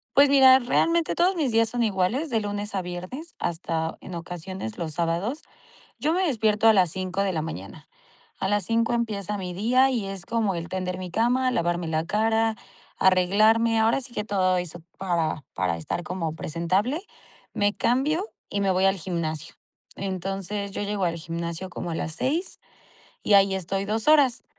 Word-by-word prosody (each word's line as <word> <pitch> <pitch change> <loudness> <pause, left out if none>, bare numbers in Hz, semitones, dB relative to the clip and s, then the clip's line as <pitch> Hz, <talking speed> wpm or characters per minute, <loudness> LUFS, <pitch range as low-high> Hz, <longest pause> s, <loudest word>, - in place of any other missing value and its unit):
Pues 280 0 +7
mira, 265 -2 +8
realmente 330 +6 +1
todos 360 +2 +2
mis 280 -8 0
días 225 0 +3
son 240 0 0
iguales 215 - 0
de 225 -3 0
lunes 205 0 -4
a 190 - 0
viernes 185 - -7
hasta 165 -1 -2
en 185 - -9
ocasiones 175 - -6
los 160 -2 -4
sábados. 175 - -1 0.6
Yo 310 +2 +1
me 370 +2 +1
despierto 220 - +2
a - - +8
las 185 -5 +3
5 185 +1 -2
de 195 -1 0
la 155 -2 -1
mañana. 100 - -8 0.5
A - - -1
las 205 -1 +1
5 230 +3 +1
empieza 210 -4 -2
mi 180 -2 -5
día 250 +7 +3
y 225 -6 -1
es 195 -2 -6
como 220 -5 0
el 170 0 -5
tender 185 -1 -3
mi 180 -1 -6
cama, 245 +6 +2
lavarme 175 -7 -1
la 160 0 0
cara, 220 +2 +1 0.4
arreglarme. 215 +5 +4
Ahora 225 +4 +3
sí 250 -2 -9
que 210 - -2
todo 185 -3 +1
eso 175 -1 -5 0.2
para 165 -5 -1
para 90 -2 -1
estar 85 - -4
como 165 -2 -3
presentable. 185 - -1 0.5
Me 205 0 +1
cambio 295 - +1 0.2
y 200 - -2
me 195 -1 +2
voy 185 +1 +2
al 195 0 +4
gimnasio. 160 -4 -4 0.4
Entonces 195 +1 -3
yo 200 - -4
llego 200 -2 -1
al 170 -1 0
gimnasio 170 +2 -5
como 175 -1 -5
a 165 - -2
las 155 - -3
6 315 - -2 0.6
y - - 0
ahí 195 -1 +5
estoy 195 +2 -2
2 220 +1 -1
horas. 285 -5 +4
195 Hz, 180 wpm, -25 LUFS, 175-230 Hz, 0.6 s, mira